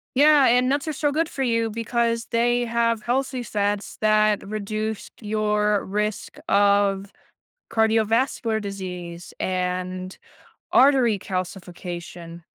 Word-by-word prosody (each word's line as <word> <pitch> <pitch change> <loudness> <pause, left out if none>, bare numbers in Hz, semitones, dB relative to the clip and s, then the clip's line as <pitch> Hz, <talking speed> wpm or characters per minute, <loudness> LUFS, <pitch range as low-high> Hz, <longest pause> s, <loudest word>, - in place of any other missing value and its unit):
Yeah, 290 0 +6
and 250 +1 +4
nuts 285 +3 0
are - - -1
so 290 0 0
good 320 +2 0
for 270 - -4
you 230 -2 +1
because 230 +1 -1
they 240 +1 +2
have 230 -1 0
healthy 255 +1 -1
fats 205 -2 -2
that 215 -1 +3
reduce 215 +1 -4
your 210 -1 0
risk 210 +1 -3
of 200 -1 +2 0.6
cardiovascular 225 +1 +1
disease 180 -3 -7
and 185 0 -3 0.5
artery 255 -5 +5
calcification. 175 -2 -6
215 Hz, 110 wpm, -23 LUFS, 195-235 Hz, 0.6 s, Yeah